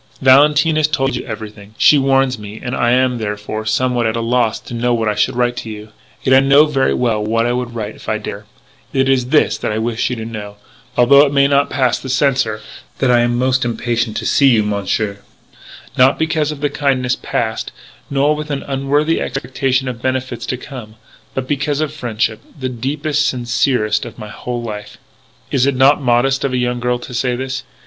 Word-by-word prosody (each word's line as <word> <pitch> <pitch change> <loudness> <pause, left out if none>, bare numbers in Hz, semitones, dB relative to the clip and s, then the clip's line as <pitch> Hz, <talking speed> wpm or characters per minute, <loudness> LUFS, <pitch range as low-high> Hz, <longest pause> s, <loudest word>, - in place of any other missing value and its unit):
"Valentine 150 +4 +5
has 155 -1 +3
told 135 -3 0
you - - -4
everything, 105 -2 -8
she - - +6
warns 135 -2 +2
me, 105 +1 -9
and 125 -1 -4
I 120 - +1
am, 125 0 +2
therefore, 105 0 -4
somewhat 120 +1 +1
at 110 - -1
a - - -1
loss 115 -1 +1
to - - -10
know 120 +1 +1
what 115 -1 -1
I 105 - +2
should 125 +3 0
write 120 0 +1
to 115 - -5
you. 105 0 -8 0.3
"Yet, 130 - +3
I 130 - +8
know 140 +2 +5
very 135 -3 +1
well 115 -4 0
what 115 +2 0
I 120 - +1
would 125 -1 -3
write 110 -2 -4
if - - -10
I 110 - +1
dare. 105 0 -7 0.5
It 135 0 +2
is 130 -2 +2
this: 150 +4 +2
that - - -2
I 105 - -2
wish 115 +1 -1
you 125 - -2
to 110 -1 -6
know 105 -3 -7 0.4
although 140 +4 +7
it 145 - +1
may 140 -1 +4
not 140 0 +2
pass 130 -3 +1
the 130 - -8
censor 130 -5 +1 0.4
that 130 -2 +2
I 120 - +5
am 120 0 +1
most 130 +1 +1
impatient 120 -1 -1
to - - -4
see 140 - +4
you, 115 -5 +4
Monsieur. 100 0 -2 0.8
Not 130 +2 +4
because 160 -1 0
of 150 -1 -4
kindness 130 -3 +1
past, 110 -1 -3 0.4
nor 140 +2 +2
with 150 0 -6
an 140 -2 -3
unworthy 145 +4 0
expectation 130 0 -1
of 120 -2 -5
benefits 130 -3 -3
to 125 - -2
come. 120 -5 -10 0.4
But 130 -1 -3
because 145 0 -1
of 155 -1 -2
friendship, 115 -6 -2 0.2
the 130 -1 -2
deepest, 145 +5 -1
sincerest 120 -3 0
of 115 - -11
my 110 -2 -8
WHOLE 120 +1 -5
LIFE. 105 -2 -7 0.5
"Is 135 -1 +2
it 140 - +1
not 135 +3 +4
modest 130 +2 +2
of 135 - -1
a - - +1
young 125 0 -1
girl 125 0 0
to 120 +1 -10
say 125 0 0
this? 130 0 -4
125 Hz, 210 wpm, -17 LUFS, 115-135 Hz, 0.8 s, I